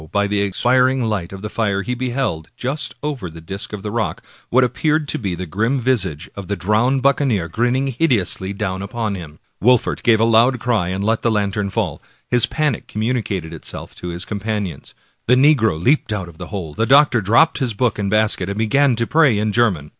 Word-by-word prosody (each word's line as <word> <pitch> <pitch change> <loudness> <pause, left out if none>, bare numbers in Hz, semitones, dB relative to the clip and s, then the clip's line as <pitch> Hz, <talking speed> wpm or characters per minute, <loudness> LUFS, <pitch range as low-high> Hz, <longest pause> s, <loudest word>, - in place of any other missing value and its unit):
by 100 0 +1
the 100 0 0
expiring 125 +6 +2
light 105 -6 -2
of 95 +1 -9
the 105 - -4
fire 100 -3 -1
he 125 - -2
beheld, 125 -10 -2
just 135 +4 -3
over 140 - -3
the 80 +1 -11
disk 95 +5 -6
of 105 -2 -7
the 105 - -4
rock, 115 -1 -2 0.3
what 130 +2 +4
appeared 150 +4 0
to - - -1
be 95 -4 -3
the 90 +2 -5
grim 115 - 0
visage 95 - 0
of 100 -3 -7
the 100 - -1
drowned 110 +8 +1
buccaneer, 135 - +2
grinning 120 +9 0
hideously 120 - 0
down 95 -2 -3
upon 105 +1 -3
him. 80 -5 -8 0.3
Wolfert 125 0 +3
gave 115 -2 +4
a - - +3
loud 115 +3 +4
cry 115 -7 0
and 95 +2 -3
let 115 +2 +1
fall 115 - +1
the 110 - 0
lantern. 100 -3 -1 0.3
His 120 -1 +4
panic 150 -2 -1
communicated 105 -7 -2
itself 80 - -7
to 90 - -8
his 85 +1 -4
companions. 100 -6 -4 0.3
The 125 - +5
negro 130 - +3
leaped 130 - +2
out 100 -4 -3
of 85 -1 -14
the 90 - -7
hole, 90 -8 -6
the 115 +8 -1
doctor 135 -3 +5
dropped 115 - +3
his 125 -6 -1
book 115 -1 0
and 100 -1 -1
basket, 105 -3 +2
and 100 - -4
began 125 +4 +2
to 115 +1 0
pray 145 -5 +3
in 105 +1 0
German. 100 -10 +1
110 Hz, 205 wpm, -19 LUFS, 95-125 Hz, 0.3 s, The